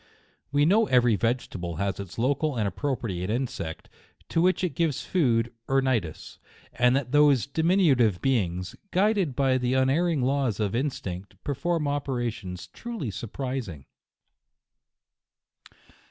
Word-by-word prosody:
We 145 +1 +3
know 210 +6 +4
every 120 -3 +4
vegetable 100 -7 -2
has 100 +4 -2
its 100 -1 -8
local 140 +4 +1
and 105 -3 +1
appropriate 100 -5 -3
insect, 120 -9 -3 0.4
to 165 - +1
which 185 +1 +2
it 175 -5 0
gives 155 -1 -1
food 120 -9 +1
or 135 0 +3
nidus, 115 -12 -2 0.3
and 125 +1 +3
that 135 -3 -1
those 145 -4 +5
diminu 165 +1 +3
tive 110 -7 +2
beings, 90 -9 -1
guided 195 - +1
by 135 -2 +2
the 125 +1 0
unerring 140 +3 +2
laws 130 -5 0
of 105 -2 0
instinct, 100 -7 -3
perform 150 +3 -1
operations 120 -10 -3
truly 230 - -6
surprising. 115 - -5
130 Hz, 125 wpm, -26 LUFS, 105-145 Hz, 0.4 s, those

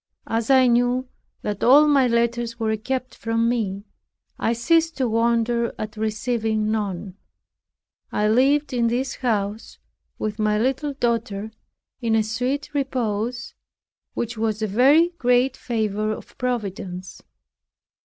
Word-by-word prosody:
As 225 +1 -2
I 260 -1 +6
knew 245 +1 +2 0.4
that 205 -1 -3
all 285 +5 +7
my 275 -3 +4
letters 235 0 0
were 220 -1 0
kept 255 +3 -4
from 230 0 0
me, 205 -5 -1 0.6
I - - +1
ceased 325 +7 +2
to 260 -2 +1
wonder 235 +1 +1
at 215 +1 -5
receiving 220 0 -1
none. 200 -3 -3 0.9
I 210 - +1
lived 275 +6 +3
in 235 -2 +2
this 250 +3 -1
house 215 -3 -2 0.4
with 215 0 -4
my 210 0 +2
little 265 +5 0
daughter 230 -5 -2 0.5
in 225 -2 +1
a 220 - +3
sweet 255 +7 -2
repose, 245 -4 -2 0.6
which 230 -1 -3
was 220 -1 -1
a - - +1
very 275 - +5
great 250 +1 +3
favor 215 -2 -1
of 215 - -8
Providence. 195 -7 -4
235 Hz, 130 wpm, -23 LUFS, 215-255 Hz, 0.9 s, all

